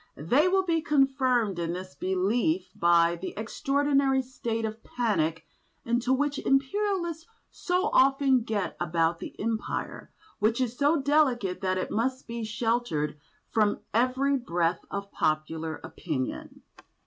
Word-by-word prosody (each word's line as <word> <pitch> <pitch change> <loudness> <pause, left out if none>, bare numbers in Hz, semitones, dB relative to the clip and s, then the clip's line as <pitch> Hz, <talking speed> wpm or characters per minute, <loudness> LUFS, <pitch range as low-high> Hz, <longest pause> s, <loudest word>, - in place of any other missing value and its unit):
They 255 - +3
will 380 +1 +3
be 335 -3 +1
confirmed 260 - +2
in 170 0 -2
this 185 -2 -7
belief 185 +2 0
by 170 0 +4
the 185 - -6
extraordinary 275 +3 +1
state 230 -3 -3
of 220 +1 -6
panic 165 -10 -1 0.4
into 240 +2 0
which 285 +2 +1
Imperialists 340 +3 0 0.2
so 365 +4 -1
often 270 -1 +4
get 210 -6 -2
about 165 -1 +1
the - - -9
Empire, 225 +1 -3 0.3
which 220 +3 +2
is 250 -2 -1
so 290 +4 +3
delicate 255 -10 +2
that 185 -1 0
it 185 - -3
must 255 +4 -1
be 235 -1 -5
sheltered 215 -10 -1 0.3
from 210 -2 +2
every 260 +4 +2
breath 170 -7 -1
of 200 0 -5
popular 155 +1 -1
opinion. 155 -5 -5
230 Hz, 130 wpm, -27 LUFS, 180-270 Hz, 0.4 s, by